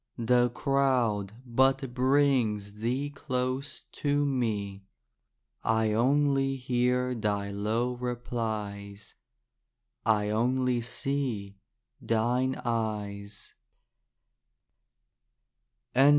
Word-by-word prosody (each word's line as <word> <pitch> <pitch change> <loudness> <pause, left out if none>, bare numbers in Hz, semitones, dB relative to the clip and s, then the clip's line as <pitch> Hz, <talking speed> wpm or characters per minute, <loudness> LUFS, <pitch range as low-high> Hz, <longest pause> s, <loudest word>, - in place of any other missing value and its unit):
The 120 +1 +3
crowd 125 -6 +1
but 130 +1 +2
brings 125 -6 +2
thee 130 +6 -1
close 130 0 -3
to 145 0 +1
me. 105 -7 -1 0.8
I 110 -1 +2
only 135 +3 +2
hear 125 0 +1
thy 105 -3 -1
low 110 +5 0
replies; 110 -5 -4 0.9
I 105 -2 +2
only 125 +2 +1
see 120 -5 -3 0.4
thine 125 +4 +1
eyes. 105 -3 -3
120 Hz, 70 wpm, -29 LUFS, 105-130 Hz, 0.9 s, The